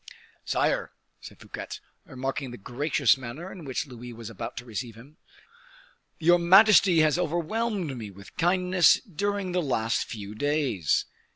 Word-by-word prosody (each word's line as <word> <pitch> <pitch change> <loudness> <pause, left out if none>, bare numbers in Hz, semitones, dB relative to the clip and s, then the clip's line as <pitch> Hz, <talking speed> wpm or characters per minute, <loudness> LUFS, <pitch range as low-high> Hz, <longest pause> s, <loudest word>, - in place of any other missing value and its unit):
"Sire," - - 0 0.3
said - - -12
Fouquet, - - -7 0.3
remarking 135 +1 -4
the 120 - -8
gracious 125 +3 +1
manner 135 +9 -8
in 175 -5 -10
which 130 -3 -2
Louis 125 -2 -10
was 115 -1 -9
about 110 - -7
to 120 - -6
receive 115 0 -6
him, 135 +7 -16 1.0
"your 175 +1 +4
majesty 185 -1 +6
has 155 +2 +3
overwhelmed 180 - -1
me 110 -4 -7
with 100 +1 -14
kindness 180 +1 +4
during 200 -1 -3
the 180 0 +1
last 115 -6 0
few 105 -2 -7
days. 135 - 0
145 Hz, 145 wpm, -27 LUFS, 120-180 Hz, 1.0 s, majesty